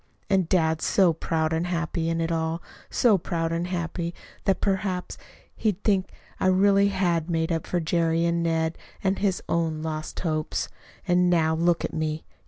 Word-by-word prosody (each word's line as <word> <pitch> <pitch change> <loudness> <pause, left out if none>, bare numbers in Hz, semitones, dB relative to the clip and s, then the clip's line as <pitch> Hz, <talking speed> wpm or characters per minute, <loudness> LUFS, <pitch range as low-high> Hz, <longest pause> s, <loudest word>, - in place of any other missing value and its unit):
And 190 -4 +2
dad 160 -3 +2
so 185 -4 +4
proud 160 0 -1
and 165 +2 0
happy 170 -1 -1
in 165 0 0
it 165 +1 -1
all 165 0 -1 0.3
so 215 -6 +4
proud 165 -1 -2
and 170 +1 -1
happy 170 -1 -3 0.3
that 195 - +2
perhaps 190 -2 -1 0.4
he'd 210 -3 -1
think 195 -3 +1 0.3
I - - +2
really 200 +1 +5
had 180 -4 0
made 165 0 0
up 165 -1 -1
for 180 - 0
Jerry 165 0 +1
and 170 0 +1
Ned, 160 -1 0 0.2
and 195 0 +1
his 195 -3 0
own 160 -2 0
lost 155 -1 -4
hopes. 155 -3 -1 0.4
"And, 180 0 +4
now, 160 -2 +3
look 170 +1 +2
at - - -5
me! 155 0 -2
170 Hz, 175 wpm, -26 LUFS, 160-185 Hz, 0.4 s, really